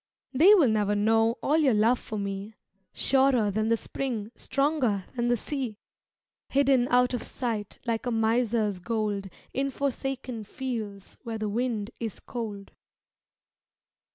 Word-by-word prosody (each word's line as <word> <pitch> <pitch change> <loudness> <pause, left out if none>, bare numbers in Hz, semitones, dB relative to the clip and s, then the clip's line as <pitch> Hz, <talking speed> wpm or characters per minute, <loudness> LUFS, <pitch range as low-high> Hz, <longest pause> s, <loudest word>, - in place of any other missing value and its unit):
They 350 +11 +7
will 330 -9 +5
never 210 -1 +1
know 225 +3 +3
All 300 - +3
your 270 -7 +4
love 230 +4 +3
for 215 - -6
me 200 +1 -4 0.4
Surer 265 -6 +3
than 215 +2 0
the 230 0 +3
spring, 225 -4 -4
Stronger 270 -9 0
than 240 -1 0
the 240 0 +3
sea; 255 -3 -4 0.7
Hidden 270 -3 +3
out 250 0 +3
of 245 - -1
sight 220 -5 -4
Like 230 0 -1
a - - 0
miser's 225 -3 +1
gold 205 -1 -2 0.2
In 275 +1 0
forsaken 265 -3 -3
fields 215 -4 -6
Where 230 -2 -4
the 215 -1 -2
wind 230 -1 -1
is 225 -4 -4
cold. 210 -5 -6
230 Hz, 140 wpm, -27 LUFS, 210-255 Hz, 0.7 s, They